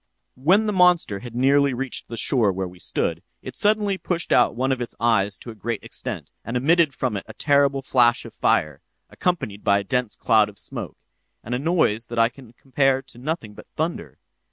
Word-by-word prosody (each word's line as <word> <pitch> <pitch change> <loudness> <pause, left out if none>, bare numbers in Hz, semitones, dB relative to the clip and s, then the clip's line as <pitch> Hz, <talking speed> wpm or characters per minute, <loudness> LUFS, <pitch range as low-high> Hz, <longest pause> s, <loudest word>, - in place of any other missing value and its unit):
"'When 185 +12 +3
the 210 - 0
monster 180 - +3
had 120 +2 -10
nearly 140 +1 +3
reached 135 0 -5
the 115 - -7
shore 115 -3 +2
where 95 0 -3
we 90 0 -14
stood, 85 -1 -2 0.2
it 130 - -7
suddenly 205 0 +2
pushed 175 -1 -2
out - - +4
one 130 +2 0
of 130 -2 -1
its 120 - -5
eyes 105 -4 +2
to 120 - -9
a - - -9
great 110 +1 -4
extent, - - -6
and 115 +3 -2
emitted 160 +4 +3
from 125 -5 -1
it 95 - -6
a - - -11
terrible 140 -2 +2
flash 120 -2 +3
of - - -10
fire, 75 -3 +1 0.3
accompanied 135 - -2
by 100 0 +4
a 100 - -2
dense 125 +1 -1
cloud 110 -2 +3
of 100 - -15
smoke, - - -7 0.5
and 120 - -5
a 125 - 0
noise 135 -8 +1
that 120 - -7
I 115 0 +4
can 125 -1 -16
compare 135 +1 +1
to 135 -3 -15
nothing 130 -6 -4
but - - -13
thunder. - - -3
125 Hz, 205 wpm, -23 LUFS, 110-140 Hz, 0.5 s, out